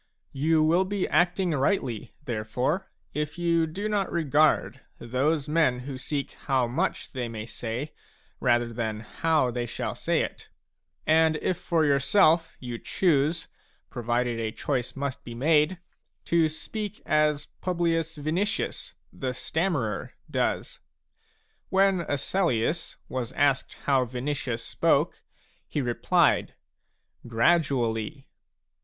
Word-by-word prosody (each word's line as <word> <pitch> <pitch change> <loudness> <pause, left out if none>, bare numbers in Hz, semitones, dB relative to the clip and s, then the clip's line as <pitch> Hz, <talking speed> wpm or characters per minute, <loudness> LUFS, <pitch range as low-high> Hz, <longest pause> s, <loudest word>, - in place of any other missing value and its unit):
You 155 +3 +3
will 170 +4 +4
be 195 0 -1
acting 175 +3 +2
rightly, 135 - 0
therefore, 125 - -1 0.2
if 150 +1 -3
you 170 -1 +2
do 195 +7 -3
not 205 -3 0
regard 155 -2 +2 0.2
those 135 +5 0
men 150 -5 +2
who 135 +1 -6
seek 140 +1 -3
how 130 -3 0
much 120 +2 -2
they 125 -3 -3
may 110 -1 -5
say, 120 +5 -5 0.5
rather 120 0 +2
than 110 -2 -2
how 150 +3 +1
they 120 0 -2
shall - - -3
say - - 0
it, - - -5 0.6
and 160 0 +4
if 180 +4 0
for 165 -2 +1
yourself 155 +4 +3
you 120 -2 -5
choose, 165 -2 +1 0.4
provided 120 -1 -1
a 110 -1 -1
choice 125 0 -2
must 140 -1 -3
be 120 - -8
made, 150 +6 +3 0.5
to 165 -2 +3
speak 210 +7 -5
as 150 -1 +2 0.2
Publius 165 -3 0
Vinicius 175 +9 -2 0.2
the 130 -2 -3
stammerer 145 - -1 0.2
does. - - -1 0.9
When 195 -1 +3
Asellius 150 0 0
was 125 -3 -4
asked 140 -2 +1
how 135 -3 +3
Vinicius 125 -1 -3
spoke, - - +1 0.5
he - - -1
replied: 120 -3 +2 0.4
" - - -21
Gradually 125 -1 +1
145 Hz, 120 wpm, -27 LUFS, 125-165 Hz, 0.9 s, will